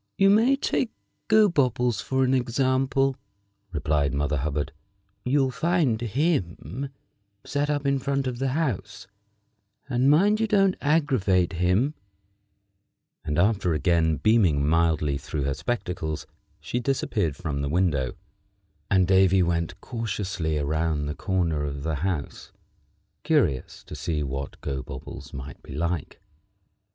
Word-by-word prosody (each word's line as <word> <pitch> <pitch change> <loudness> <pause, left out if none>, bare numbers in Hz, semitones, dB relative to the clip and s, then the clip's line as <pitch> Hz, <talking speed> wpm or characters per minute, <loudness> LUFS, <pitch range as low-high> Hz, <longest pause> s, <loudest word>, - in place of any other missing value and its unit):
"You 195 0 +5
may 230 +6 +5
take 265 -3 0 0.4
Gobobbles 135 - +3
for 130 0 0
an 130 0 +2
example," 130 +1 +1 0.5
replied 75 -3 0
Mother 75 +1 0
Hubbard. 75 +1 -2 0.5
"You'll 135 0 +2
find 155 -6 +1
him 120 - -1 0.5
set 145 +1 -1
up 145 -1 -1
in 140 -1 +2
front 140 +1 -1
of 125 -2 -3
the 135 - 0
house, 115 - -2 0.8
and 130 0 +2
mind 200 +8 +4
you 225 - +1
don't 195 -3 +3
aggravate 130 - +2
him;" 90 - +2 1.3
and 75 - -2
after 95 -2 +2
again 80 -2 +2
beaming 90 - +3
mildly 80 -3 +2
through 75 +1 -4
her 70 0 0
spectacles 90 - -3 0.3
she 120 - -3
disappeared 110 - -1
from 70 -2 -3
the 70 - -2
window, 75 -6 +1 0.7
and 95 -2 +3
Davy 95 0 +5
went 85 +1 -1
cautiously 100 -9 -3
around 75 +1 0
the 75 - -3
corner 85 -4 -1
of 70 -1 -4
the 80 -1 -1
house, 85 -6 -3 0.7
curious 65 -2 0
to - - -11
see 80 -4 -2
what 70 0 -5
Gobobbles 65 -3 -6
might 70 +1 -8
be 65 - -10
like. 85 0 -2
95 Hz, 125 wpm, -25 LUFS, -, 1.3 s, You